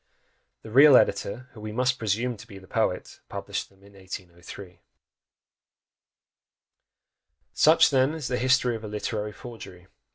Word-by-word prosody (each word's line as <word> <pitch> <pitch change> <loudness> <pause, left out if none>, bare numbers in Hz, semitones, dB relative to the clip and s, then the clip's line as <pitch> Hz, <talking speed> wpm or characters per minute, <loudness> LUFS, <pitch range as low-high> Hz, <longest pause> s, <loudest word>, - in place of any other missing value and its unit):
The 110 - -10
real 140 +2 +8
editor, 100 +5 0
who 110 - -13
we 105 0 -6
must 125 +2 0
presume 115 +3 -1
to 125 - -13
be 100 -4 -11
the 95 - -14
poet, - - -2
published - - -5
them 95 0 -26
in 100 0 -18
1803. 90 -1 -10 2.7
Such, 155 +1 +5
then, 135 +3 +2
is 150 -5 -5
the 125 - -2
history 130 -1 +2
of 110 - -8
a - - -6
literary 105 0 -4
forgery! 105 -6 -11
110 Hz, 140 wpm, -26 LUFS, 100-125 Hz, 2.7 s, real